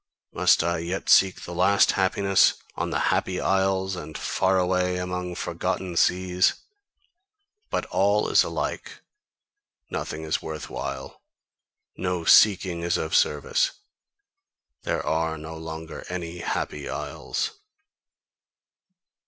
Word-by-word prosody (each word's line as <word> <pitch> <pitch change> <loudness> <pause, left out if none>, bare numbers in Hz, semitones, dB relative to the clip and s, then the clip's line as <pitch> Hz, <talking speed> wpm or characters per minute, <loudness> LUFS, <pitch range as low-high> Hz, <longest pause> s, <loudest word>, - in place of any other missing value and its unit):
Must - - +4
I 85 0 0
yet 90 +4 -4
seek 95 -1 +5
the 90 - -7
last 95 +3 +4
happiness 95 0 +3 0.2
on - - -2
the - - -1 0.2
Happy 90 -1 -1
Isles, 95 0 +1
and 80 -3 -7
far 95 0 +1
away 90 0 +1
among 90 0 -4
forgotten 90 0 -3
seas? 90 +1 +2 1.1
But - - -1
all 100 +3 +2
is - - +5
alike, - - -4 0.9
nothing 80 +1 -4
is 80 0 -1
worth 80 -1 -7
while, - - -6 0.8
no 90 -2 -2
seeking 95 -4 +5
is 85 0 0
of 80 - -4
service, 75 -1 +2 1.1
there - - -2
are 80 0 0
no 80 +2 -8
longer 80 0 -7
any 90 -1 -5
Happy 75 -3 -3
Isles!" - - -3
90 Hz, 115 wpm, -25 LUFS, 80-95 Hz, 1.1 s, seek